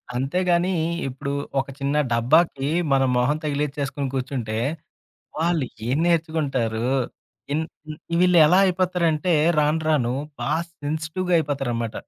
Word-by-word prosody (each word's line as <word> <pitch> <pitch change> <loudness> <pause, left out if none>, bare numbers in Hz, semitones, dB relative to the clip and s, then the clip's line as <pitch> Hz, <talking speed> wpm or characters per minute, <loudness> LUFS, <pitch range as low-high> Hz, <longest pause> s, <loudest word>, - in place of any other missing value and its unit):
అంతేగానీ 175 +7 +1 0.4
ఇప్పుడు 135 +2 -4 0.3
ఒక 135 - -2
చిన్న 140 +2 -1 0.2
డబ్బాకి 135 +4 +2 0.2
మనం 135 -1 +3
మొహం 140 +5 +2
తగిలిచ్చేసుకొని 145 -1 -2
కూర్చుంటే, 125 -4 -3 0.8
వాళ్ళు 165 -3 +1 0.2
ఏం 135 +4 +1
నేర్చుకుంటారు? 140 -9 0 0.7
ఇన్ 155 +2 0 0.6
వీళ్ళెలా 180 -1 +6
అయిపోతారంటే, 180 -3 +1 0.2
రాను 150 +2 +2
రాను 125 -5 +1 0.3
బా 120 - -2 0.2
సెన్సిటివ్‌గా 155 +4 -2
అయిపోతారనమాట. 120 -7 -2
145 Hz, 100 wpm, -23 LUFS, 135-165 Hz, 0.8 s, వీళ్ళెలా